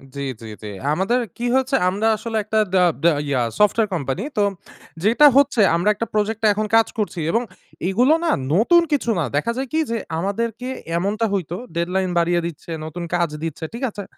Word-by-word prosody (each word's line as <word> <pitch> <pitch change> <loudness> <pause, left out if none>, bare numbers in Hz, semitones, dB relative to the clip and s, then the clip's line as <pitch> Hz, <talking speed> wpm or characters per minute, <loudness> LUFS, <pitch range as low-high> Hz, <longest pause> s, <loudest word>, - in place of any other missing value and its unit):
জি, 140 - -4 0.2
জি, - - -9 0.2
জি। - - -6 0.3
আমাদের 195 +9 +1 0.2
কি 240 - -3
হয়েছে? 265 +1 +1
আমরা 205 +4 0
আসলে 225 0 -4
একটা 220 +1 0 0.2
দা 180 - +5 0.2
দা 170 - +6 0.2
ইয়া 130 -3 +1 0.2
সফটওয়ার 210 +1 +3
কোম্পানি। 135 -6 -2
তো 205 - +4 0.6
যেটা 235 +8 +5
হচ্ছে 280 -5 +4
আমরা 180 +5 +2
একটা 230 +3 -3
প্রজেক্ট 215 +1 0
এ - - +6
এখন 215 +1 -1
কাজ 225 - +5
করছি। 190 -5 -2
এবং 230 - +2 0.5
এগুলো 250 +10 +4
না - - +2 0.2
নতুন 340 - +5
কিছু 275 -5 0
না। - - +1
দেখা 190 +11 +1
যায় 265 0 -2
কি? 320 - +2
যে 230 - 0 0.2
আমাদেরকে 230 +5 -3 0.3
এমনটা 210 +5 0
হইতো, 175 -3 -2 0.2
deadline 180 +2 0
বাড়িয়ে 175 +1 +2
দিচ্ছে, 170 0 -7
নতুন 170 +2 -6
কাজ 170 -2 +1
দিচ্ছে। 160 0 -4
ঠিক 240 +3 -6
আছে? 205 -1 -7
210 Hz, 190 wpm, -21 LUFS, 175-230 Hz, 0.6 s, দা